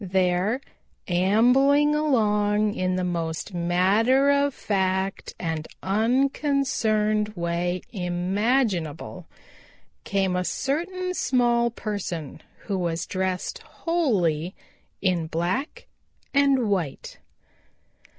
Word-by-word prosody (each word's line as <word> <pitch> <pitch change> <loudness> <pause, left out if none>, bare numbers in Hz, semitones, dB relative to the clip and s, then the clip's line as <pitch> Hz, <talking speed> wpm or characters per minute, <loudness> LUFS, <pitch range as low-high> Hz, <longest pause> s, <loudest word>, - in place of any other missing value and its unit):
There, 190 +5 +1 0.5
ambling 250 +11 +4
along 210 -8 +2
in 185 -1 -1
the 185 - -1
most 170 +1 -3
matter 200 +11 +3
of 285 0 +2
fact 190 -4 -2
and 160 -2 -3 0.2
unconcerned 220 -2 +1
way 175 +1 -2
imaginable, 180 - -1 0.8
came 195 -2 0
a 180 - 0
certain 350 - -2
small 240 -6 +2
person 200 - -5 0.2
who 195 -3 -3
was 170 -1 -2
dressed 185 -1 -2
wholly 190 - -1 0.5
in 180 -4 +1
black 175 - -2 0.5
and 275 -4 +3
white. 175 -9 -3
200 Hz, 85 wpm, -25 LUFS, 180-255 Hz, 0.8 s, ambling